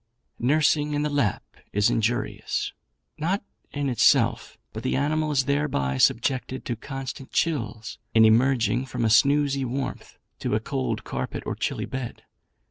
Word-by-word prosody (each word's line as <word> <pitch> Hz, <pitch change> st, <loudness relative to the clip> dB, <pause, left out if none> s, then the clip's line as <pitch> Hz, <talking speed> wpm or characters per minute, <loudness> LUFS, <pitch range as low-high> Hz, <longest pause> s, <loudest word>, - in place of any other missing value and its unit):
"Nursing 150 Hz, +3 st, +2 dB
in 145 Hz, -, 0 dB
the 150 Hz, -, -1 dB
lap 140 Hz, -10 st, 0 dB, 0.3 s
is 105 Hz, 0 st, +3 dB
injurious; 115 Hz, +2 st, -1 dB, 0.5 s
not 185 Hz, +7 st, 0 dB, 0.3 s
in 145 Hz, -1 st, -2 dB
itself, 125 Hz, -4 st, +3 dB, 0.2 s
but 110 Hz, -, -5 dB
the 130 Hz, -, -1 dB
animal 155 Hz, +3 st, +1 dB
is 135 Hz, -3 st, +2 dB
thereby 135 Hz, -, 0 dB
subjected 130 Hz, -, +1 dB
to 120 Hz, -, -2 dB
constant 135 Hz, +2 st, -7 dB
chills, 115 Hz, -10 st, -2 dB, 0.2 s
in 110 Hz, 0 st, +7 dB
emerging 120 Hz, +1 st, +3 dB
from 120 Hz, -, -2 dB
a 110 Hz, -, +2 dB
snoozy 140 Hz, +2 st, +4 dB
warmth 130 Hz, +2 st, -4 dB, 0.2 s
to -, -, -1 dB
a -, -, +2 dB
cold 65 Hz, -2 st, -3 dB
carpet -, -, -4 dB
or -, -, -2 dB
chilly -, -, -2 dB
bed. 130 Hz, -3 st, -6 dB
130 Hz, 145 wpm, -25 LUFS, 115-145 Hz, 0.5 s, in